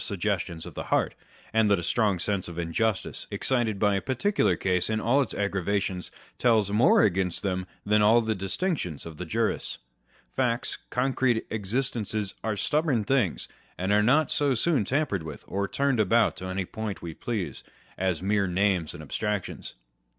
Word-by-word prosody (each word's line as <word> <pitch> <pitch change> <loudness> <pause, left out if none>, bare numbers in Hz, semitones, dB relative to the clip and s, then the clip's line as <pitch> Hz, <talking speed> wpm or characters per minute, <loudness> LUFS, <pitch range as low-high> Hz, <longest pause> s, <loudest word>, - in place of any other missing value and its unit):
69 100 - -2
suggestions 85 -4 -2
of - - -9
the - - -5
heart, - - +1 0.4
and 110 -1 +4
that 100 - +4
a 85 - -4
strong 105 +1 +2
sense 95 +2 -1
of 85 -1 -8
injustice, 95 +5 -1
excited 120 -5 0
by 105 0 +3
a 95 - 0
particular 185 - +1
case 90 0 0
in 110 0 0
all 120 +6 +3
its 130 - -2
aggravations, 100 -2 -1 0.3
tells 110 -5 +3
more 110 +5 +5
against 95 -2 +1
them 95 -2 -1 0.2
than 105 +1 +3
all 110 +3 +6
the 110 -1 0
distinctions 95 - -2
of 80 -2 -9
the 90 - -6
jurists. 115 +5 -1 0.6
Facts, 125 -2 0
concrete 125 -2 +1
existences, 110 -1 -1
are 110 -2 -1
stubborn 145 - +1
things, 115 - 0 0.3
and 95 +2 -1
are 105 0 +5
not 145 +8 +3
so 140 -3 +2
soon 140 -2 +1
tampered 130 - 0
with 80 -2 -8
or 100 +1 -1
turned 140 -1 +1
about 115 +3 +3
to 95 - -7
any 95 0 -2
point 110 +1 -5
we 85 -1 -5
please, 105 0 -4 0.3
as 90 -2 -1
mere 100 0 +2
names 90 -3 +1
and 75 - -8
abstractions. 105 +5 -3
105 Hz, 170 wpm, -27 LUFS, 95-120 Hz, 0.6 s, all